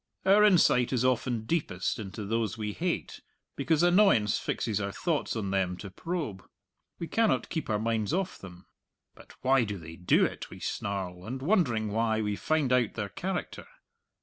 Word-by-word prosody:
Our 200 Hz, +2 st, +6 dB
insight 170 Hz, -, +4 dB
is 130 Hz, -1 st, +1 dB
often 120 Hz, -3 st, 0 dB
deepest 110 Hz, -, -1 dB
into 100 Hz, 0 st, -6 dB
those 110 Hz, 0 st, -1 dB
we 105 Hz, -1 st, -3 dB
hate, 175 Hz, 0 st, -3 dB, 0.3 s
because 150 Hz, +4 st, +1 dB
annoyance 175 Hz, -, +4 dB
fixes 105 Hz, -2 st, -2 dB
our 100 Hz, 0 st, -2 dB
thought 155 Hz, -, -1 dB
on 100 Hz, -4 st, -2 dB
them 95 Hz, -2 st, 0 dB
to 100 Hz, 0 st, -8 dB
probe. 150 Hz, -, -4 dB, 0.5 s
We 170 Hz, -, -4 dB
cannot 225 Hz, +3 st, +1 dB
keep 160 Hz, -7 st, -3 dB
our 105 Hz, -, +2 dB
minds 110 Hz, -1 st, -1 dB
off 185 Hz, +2 st, -2 dB
them. 90 Hz, -1 st, -12 dB, 0.8 s
"Why 130 Hz, -1 st, +4 dB
do 105 Hz, -2 st, -4 dB
they 80 Hz, -1 st, -10 dB
do 90 Hz, -, +3 dB
it?" -, -, -5 dB
we -, -, -11 dB
snarl, 95 Hz, -3 st, -4 dB
and 125 Hz, +6 st, -5 dB
wondering 130 Hz, -, +1 dB
why, 110 Hz, 0 st, +1 dB
we 105 Hz, -1 st, -1 dB
find 150 Hz, +1 st, +1 dB
out 125 Hz, -4 st, +2 dB
their 105 Hz, -2 st, -3 dB
character. 185 Hz, -, -4 dB
115 Hz, 170 wpm, -29 LUFS, 100-160 Hz, 0.8 s, Our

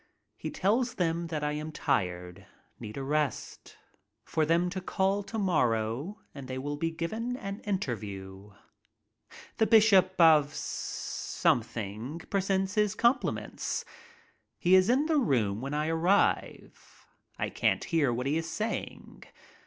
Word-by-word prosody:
He -, -, -5 dB
tells 230 Hz, +6 st, 0 dB
them 170 Hz, -1 st, -1 dB
that 155 Hz, -2 st, -3 dB
I 150 Hz, -, 0 dB
aim 150 Hz, +1 st, -4 dB
tired, 90 Hz, -, -2 dB, 0.3 s
need 110 Hz, 0 st, -8 dB
a 135 Hz, -, -3 dB
rest, 150 Hz, 0 st, -3 dB, 0.5 s
for 155 Hz, -1 st, 0 dB
them 170 Hz, +2 st, +3 dB
to 190 Hz, 0 st, -4 dB
call 195 Hz, +2 st, 0 dB
to 225 Hz, +3 st, -6 dB
morrow 145 Hz, -, 0 dB
and 140 Hz, -2 st, -9 dB
they 130 Hz, 0 st, -4 dB
will 145 Hz, +2 st, -3 dB
be 165 Hz, +3 st, -1 dB
given 220 Hz, +10 st, -3 dB
an 195 Hz, -3 st, -6 dB
interview. 105 Hz, -, -5 dB, 1.1 s
The 220 Hz, -, +3 dB
bishop 195 Hz, -4 st, +5 dB
of 155 Hz, -3 st, +6 dB
something 115 Hz, +4 st, -2 dB
presents 195 Hz, 0 st, 0 dB
his 210 Hz, -1 st, +1 dB
compliments. 240 Hz, +3 st, 0 dB, 0.7 s
He 180 Hz, -, +2 dB
is 185 Hz, +2 st, +6 dB
in 265 Hz, +5 st, +3 dB
the 310 Hz, -2 st, +2 dB
room 115 Hz, -, +1 dB
when 140 Hz, +2 st, -3 dB
I 150 Hz, +1 st, 0 dB
arrive. 170 Hz, +5 st, 0 dB, 0.3 s
I -, -, -2 dB
can't -, -, +1 dB
hear 155 Hz, -7 st, +1 dB
what 120 Hz, +2 st, -2 dB
he 145 Hz, +3 st, +1 dB
is 165 Hz, 0 st, -3 dB
saying. 220 Hz, +1 st, -5 dB
165 Hz, 135 wpm, -29 LUFS, 130-195 Hz, 1.1 s, of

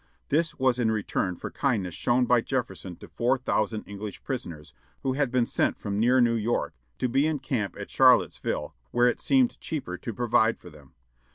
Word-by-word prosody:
This 160 Hz, +3 st, +1 dB
was 130 Hz, -1 st, +2 dB
in 115 Hz, -2 st, +2 dB
return 100 Hz, -3 st, -1 dB
for -, -, -7 dB
kindness 105 Hz, -, -1 dB
shown 125 Hz, +7 st, +2 dB
by 125 Hz, -1 st, +4 dB
Jefferson 125 Hz, -8 st, -4 dB
to -, -, -13 dB
four 125 Hz, +3 st, +1 dB
thousand 110 Hz, -3 st, -1 dB
English 100 Hz, +1 st, -8 dB
prisoners, 85 Hz, -, -6 dB, 0.3 s
who 130 Hz, -, 0 dB
had 140 Hz, -1 st, +1 dB
been 125 Hz, -1 st, +2 dB
sent -, -, 0 dB
from 100 Hz, -1 st, -3 dB
near 125 Hz, +3 st, +4 dB
New 120 Hz, -1 st, +4 dB
York, 115 Hz, +1 st, -1 dB, 0.2 s
to 125 Hz, -, 0 dB
be 135 Hz, +5 st, +2 dB
in 155 Hz, -1 st, 0 dB
camp 125 Hz, -7 st, -3 dB
at -, -, -7 dB
Charlottesville, -, -, +3 dB
where 120 Hz, 0 st, +3 dB
it 125 Hz, -, 0 dB
seemed 255 Hz, -2 st, +2 dB
cheaper 110 Hz, -, -4 dB
to 115 Hz, -, -5 dB
provide 115 Hz, 0 st, +2 dB
for 90 Hz, -, -13 dB
them. 75 Hz, -3 st, -18 dB
120 Hz, 190 wpm, -27 LUFS, 105-130 Hz, 0.3 s, by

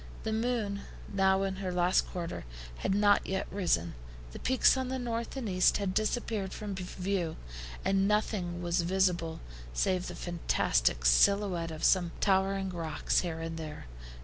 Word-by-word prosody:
The 220 Hz, -, -1 dB
moon, 220 Hz, -3 st, -1 dB, 0.3 s
now 190 Hz, 0 st, +3 dB
in 190 Hz, -1 st, -2 dB
her 190 Hz, -1 st, -3 dB
last 180 Hz, +1 st, +2 dB
quarter, 170 Hz, -2 st, -5 dB, 0.3 s
had 190 Hz, -, 0 dB
not 205 Hz, 0 st, +4 dB
yet 190 Hz, 0 st, -1 dB
risen. 130 Hz, -, 0 dB, 0.4 s
The -, -, -8 dB
peaks 260 Hz, +1 st, +4 dB
on 260 Hz, -1 st, -2 dB
the 260 Hz, -, -2 dB
north 235 Hz, 0 st, -3 dB
and 250 Hz, -4 st, -3 dB
east 185 Hz, -2 st, +3 dB
had 195 Hz, -2 st, -2 dB
disappeared 215 Hz, -2 st, -1 dB
from 210 Hz, -2 st, -5 dB
view, 185 Hz, -2 st, -3 dB, 0.5 s
and 195 Hz, 0 st, +3 dB
nothing 190 Hz, -4 st, 0 dB
was 175 Hz, 0 st, +1 dB
visible 175 Hz, -2 st, 0 dB, 0.3 s
save 185 Hz, -, +1 dB
the -, -, -6 dB
fantastic 165 Hz, -, 0 dB
SILHOUETTE 175 Hz, -, +4 dB
of 155 Hz, -1 st, -7 dB
some 175 Hz, -3 st, +3 dB
towering 195 Hz, 0 st, +2 dB
rocks 165 Hz, -3 st, 0 dB
here 165 Hz, -2 st, -3 dB
and 165 Hz, 0 st, -4 dB
there. 155 Hz, -2 st, -7 dB
190 Hz, 155 wpm, -30 LUFS, 175-205 Hz, 0.5 s, not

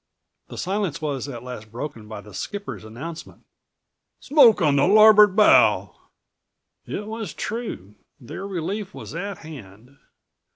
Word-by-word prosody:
The -, -, -10 dB
silence 190 Hz, -4 st, -2 dB
was 145 Hz, -4 st, -3 dB
at 125 Hz, -4 st, -8 dB
last 115 Hz, -4 st, -9 dB
broken 120 Hz, -3 st, -7 dB
by 105 Hz, -1 st, -8 dB
the 105 Hz, 0 st, -15 dB
skipper's 205 Hz, -, -6 dB
announcement: 140 Hz, +10 st, -9 dB, 0.7 s
"Smoke 265 Hz, -7 st, +5 dB
on 150 Hz, -5 st, +2 dB
the 140 Hz, -, +3 dB
larboard 210 Hz, -1 st, +7 dB
bow." 210 Hz, -1 st, +4 dB, 0.9 s
It 210 Hz, -, -5 dB
was 220 Hz, 0 st, -6 dB
true. 215 Hz, -, -6 dB, 0.3 s
Their 165 Hz, +10 st, -8 dB
relief 195 Hz, +2 st, -5 dB
was -, -, -9 dB
at 195 Hz, +3 st, -5 dB
hand. 125 Hz, -4 st, -13 dB
165 Hz, 130 wpm, -23 LUFS, 125-205 Hz, 0.9 s, larboard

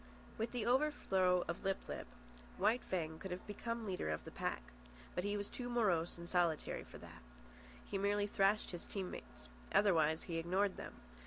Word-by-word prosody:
With 225 Hz, -, -2 dB
the 245 Hz, -3 st, -1 dB
overthrow 195 Hz, -10 st, +3 dB
of 170 Hz, -, -3 dB
Lip 195 Hz, -1 st, +2 dB
lip, -, -, -4 dB, 0.5 s
White 240 Hz, +3 st, +3 dB
Fang 160 Hz, -3 st, -2 dB
could 190 Hz, -, -5 dB
have 180 Hz, 0 st, -5 dB
become 230 Hz, +2 st, -3 dB
leader 185 Hz, -, -1 dB
of 75 Hz, -, -2 dB
the -, -, -7 dB
pack. -, -, -2 dB, 0.5 s
But 180 Hz, -, -1 dB
he 205 Hz, +1 st, 0 dB
was 205 Hz, 0 st, -2 dB
too 245 Hz, -1 st, -5 dB
morose 190 Hz, -10 st, +2 dB
and 170 Hz, 0 st, -7 dB
solitary 175 Hz, -3 st, +1 dB
for -, -, -11 dB
that. -, -, -11 dB, 0.6 s
He 195 Hz, -, -2 dB
merely 205 Hz, +1 st, +2 dB
thrashed 205 Hz, +1 st, +2 dB
his 175 Hz, -, -6 dB
team 190 Hz, -3 st, -3 dB
mates. 60 Hz, 0 st, -9 dB, 0.2 s
Otherwise 160 Hz, -6 st, +4 dB
he 165 Hz, -2 st, -2 dB
ignored 185 Hz, +4 st, +2 dB
them. -, -, -7 dB
190 Hz, 180 wpm, -38 LUFS, 170-210 Hz, 0.6 s, Otherwise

